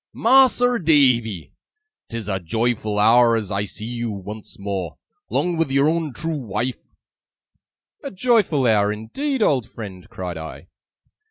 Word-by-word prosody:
'Mas'r 245 -2 +4
Davy, 120 - +2 0.6
'tis 115 -3 -5
a 95 -2 -1
joyful 110 +3 -1
hour 115 +2 +5
as 105 -3 -3
I 100 +1 -1
see 105 +2 -7
you, 120 0 -4
once 105 +1 -8
more, 100 -3 -4 0.3
'long 175 -1 0
with 165 -3 0
your 140 +2 +3
own 160 -2 0
trew 160 +4 -4
wife!' 120 +1 -4 1.1
'A 280 - -4
joyful 195 - +2
hour 105 -3 +3
indeed, 235 - -2
old 130 - +1
friend!' 95 -5 -9
cried 90 -3 -6
I. 80 0 -9
115 Hz, 140 wpm, -21 LUFS, 105-160 Hz, 1.1 s, hour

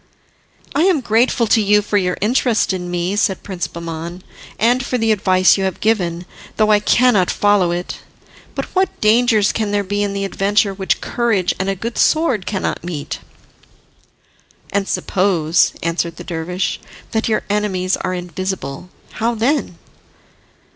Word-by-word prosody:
"I 290 - +1
am 360 -7 +3
grateful 235 +1 +2
to 220 +1 +3
you 210 0 +3
for 205 - -3
your 180 -1 -1
interest 230 -1 +2
in 180 -1 -4
me," 175 +2 -1
said 200 -2 0
Prince 185 -3 -4
Bahman, 170 +1 -7 0.3
"and 245 +3 +2
for 255 - -1
the 225 -1 +1
advice 185 -2 +3
you - - 0
have 190 - -3
given, 180 -6 0 0.3
though 215 -1 +3
I 210 - +5
cannot 210 -3 +3
follow 205 -3 +2
it. 175 +1 -4 0.6
But - - -2
what 375 0 0
dangers 220 -1 +3
can 215 -2 -2
there 205 0 +1
be 205 +1 -2
in 200 -1 -1
the 200 0 -2
adventure 200 +1 +1
which 190 0 -1
courage 225 -7 0
and 190 +1 -1
a 195 - 0
good 230 +5 -5
sword 285 - +2
cannot 195 -3 -2
meet?" 165 -5 -5 1.5
"And 200 -1 0
suppose," 175 -4 +1
answered 170 0 -1
the - - -9
dervish, 180 +2 -3 0.3
"that 220 0 0
your 220 - +1
enemies 190 -3 0
are 185 - -3
invisible, 180 -3 -5 0.3
how 230 +2 +1
then?" 260 +7 0
200 Hz, 155 wpm, -18 LUFS, 180-220 Hz, 1.5 s, I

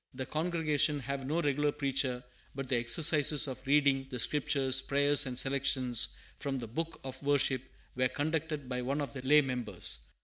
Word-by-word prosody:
The 130 0 -4
congregation 155 -1 0
have 135 +1 -4
no 165 +4 0
regular 145 +1 +1
preacher, 135 -3 -1 0.3
but 135 -1 -5
the 125 - +2
exercises 145 +4 +3
of 130 -1 -7
reading 140 -2 +3
the 130 - -5
Scriptures, 135 +1 +1
prayers, 140 +1 +3
and 125 -1 -5
selections 130 -3 +1 0.2
from 140 -1 -3
the 120 - -5
Book 165 +8 -5
of 130 -1 -7
Worship 140 -3 +2 0.3
were 130 0 +2
conducted 155 0 -3
by 125 -1 -3
one 135 +4 -2
of 145 -1 -4
the 135 - -6
lay 150 +4 +5
members. 125 - -1
140 Hz, 170 wpm, -31 LUFS, 130-145 Hz, 0.3 s, lay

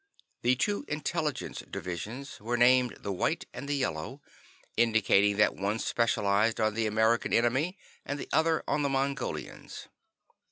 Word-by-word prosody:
The 125 +2 +3
two 205 +11 -1
intelligence 150 0 -2
divisions 110 +10 -6
were 120 +3 -2
named 125 0 +4
the 100 - -3
White 95 - -1
and 140 - -7
the 145 - +1
Yellow, 80 - -3 0.6
indicating 105 -3 +3
that 105 - +4
one 100 +3 -1
specialized 110 -2 +1
on 110 -1 +2
the 110 0 0
American 110 +2 +2
enemy 130 - +2 0.3
and 145 - -4
the - - -6
other 160 0 +2
on 150 - +1
the 140 - +1
Mongolians. 135 0 -3
120 Hz, 145 wpm, -29 LUFS, 105-140 Hz, 0.6 s, named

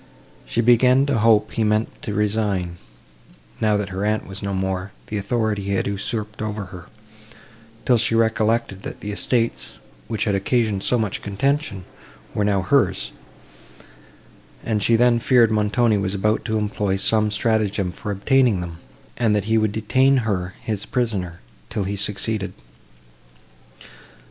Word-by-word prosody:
She 115 - 0
began 125 +3 +5
to 140 -5 +1
hope 110 -1 +4
he 115 - -1
meant 105 +1 0
to 105 - -4
resign, 100 -5 0 0.8
now 105 -1 +2
that 100 -1 -3
her 95 +1 -4
aunt 105 +1 0
was 95 +1 -8
no 100 -1 -3
more, 95 0 -2 0.2
the 105 - -2
authority 110 0 -1
he 100 - -1
had 95 - 0
usurped 105 +2 -4
over 105 -1 -3
her; 90 -1 -10 1.0
till 125 - +4
she 115 0 +2
recollected, 110 -2 +1
that - - -8
the 105 - -4
estates, 100 - -1 0.3
which 110 - -2
had 105 - 0
occasioned 105 0 +1
so 125 - +2
much 110 -4 -2
contention, 105 -1 -1 0.5
were 105 - 0
now 100 -2 +1
hers, - - +1 1.5
and 110 -2 -1
she 115 +3 +3
then 120 0 +4
feared 120 -2 +4
Montoni 105 +1 +2
was 95 0 -2
about 105 +2 +1
to 110 -1 0
employ 105 -2 -1
some 105 +2 +2
stratagem 105 -3 0
for 105 - -7
obtaining 120 +1 +2
them, 85 -2 -6 0.4
and 115 -3 +2
that 105 - +1
he 110 +2 +2
would 110 -1 +1
detain 130 +6 +3
her 95 -4 -2
his 105 -3 -3
prisoner, 100 -8 -2 0.3
till 105 - -2
he 100 +2 -3
succeeded. 100 -1 -1
105 Hz, 155 wpm, -22 LUFS, 100-115 Hz, 1.5 s, began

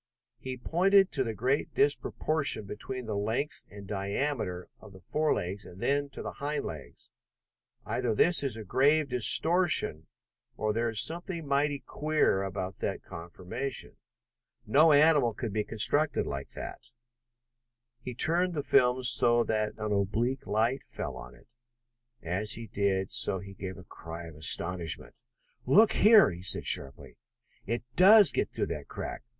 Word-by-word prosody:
He 130 -1 -6
pointed 190 +8 +3
to 135 - 0
the 115 -3 -4
great 130 +6 -1
disproportion 145 -3 0
between 125 +5 -6
the 110 -2 -4
length 110 +8 -3
and 100 0 -11
diameter 100 -1 -3
of 105 -2 -15
the 95 - -14
forelegs, 100 - -2
and 90 - -13
then 140 +3 0
to - - -9
the - - -5
hind 145 +1 -2
legs. 75 -4 -10 0.7
"Either 120 -3 -2
this 175 +10 +3
is 135 -5 -3
grave 140 +7 +2
distortion 130 - +3 0.5
or 110 0 -1
there 115 +1 -1
is 110 -2 0
something 170 - -1
mighty 140 0 0
queer 155 -10 0
about 95 -1 -5
that - - -4
conformation. 90 +10 -6 0.7
No 150 +9 +5
animal 145 -6 +4
could 115 -3 -5
be 105 0 0
constructed 130 +8 0
like 70 0 -6
that." - - -9 1.1
He 125 0 -7
turned 175 +6 +1
the 145 - -2
film 130 -2 +3
so 120 -1 +4
that 110 -2 -1
an 110 -1 -4
oblique 115 +7 -1
light 115 +6 0
fell - - -6
on - - -11
it. - - -24 0.7
As 95 +6 -1
he 115 - -6
did 100 -2 -1
so 115 -4 +2
he 100 +1 -10
gave 95 -1 -7
a 95 - -12
cry 85 0 -9
of 80 - -11
astonishment. 85 +2 0 0.5
"Look 210 - +5
here!" 215 - +6
he 85 0 -9
said 90 - +1
sharply. 70 -1 -1 0.5
"It 115 +3 -2
does 200 0 +7
get - - -2
through - - -2
that - - -9
crack! - - -6
115 Hz, 150 wpm, -29 LUFS, 95-145 Hz, 1.1 s, does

